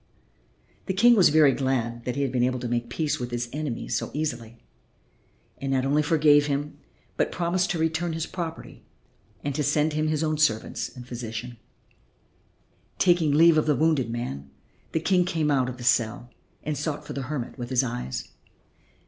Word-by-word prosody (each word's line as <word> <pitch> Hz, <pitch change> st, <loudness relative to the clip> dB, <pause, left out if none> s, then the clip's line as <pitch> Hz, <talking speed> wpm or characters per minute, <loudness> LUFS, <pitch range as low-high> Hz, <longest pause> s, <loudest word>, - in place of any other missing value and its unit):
The 190 Hz, -, -1 dB
King 240 Hz, +4 st, +6 dB
was 190 Hz, -5 st, +6 dB
very 150 Hz, -2 st, +6 dB
glad 120 Hz, -3 st, -1 dB
that 125 Hz, -, -2 dB
he 140 Hz, -, 0 dB
had 135 Hz, -, -1 dB
been 125 Hz, -1 st, 0 dB
able 125 Hz, +1 st, +1 dB
to 125 Hz, -, -3 dB
make 120 Hz, 0 st, -2 dB
peace 150 Hz, +4 st, -1 dB
with 120 Hz, -1 st, -4 dB
his 120 Hz, 0 st, -3 dB
enemy 150 Hz, -5 st, -4 dB
so 120 Hz, -, -2 dB
easily, 120 Hz, -7 st, -3 dB, 1.0 s
and 135 Hz, 0 st, -3 dB
not 130 Hz, -1 st, +1 dB
only 145 Hz, +2 st, +3 dB
forgave 150 Hz, -1 st, +4 dB
him 145 Hz, +1 st, -3 dB, 0.4 s
but -, -, +1 dB
promised 180 Hz, +2 st, 0 dB
to 185 Hz, -, -1 dB
return 160 Hz, +1 st, 0 dB
his 160 Hz, 0 st, -2 dB
property 165 Hz, -3 st, -7 dB, 0.6 s
and 145 Hz, -, -2 dB
to 150 Hz, -, -1 dB
send 150 Hz, +2 st, +1 dB
him 155 Hz, +1 st, 0 dB
his 155 Hz, 0 st, 0 dB
own 155 Hz, -1 st, -1 dB
servants 110 Hz, -8 st, 0 dB
and 125 Hz, -2 st, -12 dB
physician. 120 Hz, 0 st, -6 dB, 1.4 s
Taking 175 Hz, -4 st, +3 dB
leave 160 Hz, +2 st, +6 dB
of 155 Hz, -, -1 dB
the 150 Hz, -, +3 dB
wounded 155 Hz, -4 st, +2 dB
man 70 Hz, -, -5 dB, 0.4 s
the 160 Hz, -, 0 dB
King 180 Hz, +2 st, +2 dB
came 160 Hz, -4 st, 0 dB
out 130 Hz, -3 st, +2 dB
of 125 Hz, -, -7 dB
the 125 Hz, -, -9 dB
cell 120 Hz, 0 st, +1 dB, 0.3 s
and 150 Hz, 0 st, -2 dB
sought 150 Hz, +1 st, -3 dB
for -, -, -6 dB
the 140 Hz, -, -4 dB
hermit 135 Hz, -3 st, -4 dB
with 120 Hz, 0 st, -5 dB
his 130 Hz, 0 st, +2 dB
eyes. 120 Hz, -, -4 dB
145 Hz, 185 wpm, -26 LUFS, 120-155 Hz, 1.4 s, King